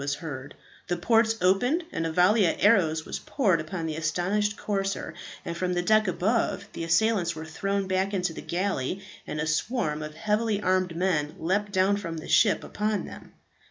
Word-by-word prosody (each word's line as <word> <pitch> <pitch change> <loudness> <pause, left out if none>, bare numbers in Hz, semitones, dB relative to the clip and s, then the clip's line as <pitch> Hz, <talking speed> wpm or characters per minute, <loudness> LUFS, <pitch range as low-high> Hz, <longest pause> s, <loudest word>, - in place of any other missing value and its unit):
was 140 0 -1
heard; 145 -3 -7 0.3
the 175 - -1
ports 225 +4 +3
opened, 245 - +2
and 165 - -2
a - - -3
volley 185 +4 +4
of - - +1
arrows 165 -7 +3
was - - -4
poured 195 - +1
upon 165 +2 -5
the 160 -1 -3
astonished 180 +7 0
corsair; 195 -1 -2 0.3
and 170 - -4
from 180 +1 -1
the 175 - +1
deck 215 +2 +4
above 200 +3 0
the - - -5
assailants 170 0 +2
were 160 0 -6
thrown 195 +4 -2
back 190 +1 0
into 180 -4 -1
the - - -7
galley, 180 -3 -2 0.3
and 150 - -4
a 150 - 0
swarm 155 -1 -1
of 155 0 -7
heavily 210 +3 0
armed 185 -3 +1
men 165 -4 0
leapt 200 +5 -1
down 190 +1 +3
from 170 -5 -5
the 155 - -7
ship 210 -3 +4
upon 210 0 -2
them. - - -11
185 Hz, 190 wpm, -27 LUFS, 165-205 Hz, 0.3 s, volley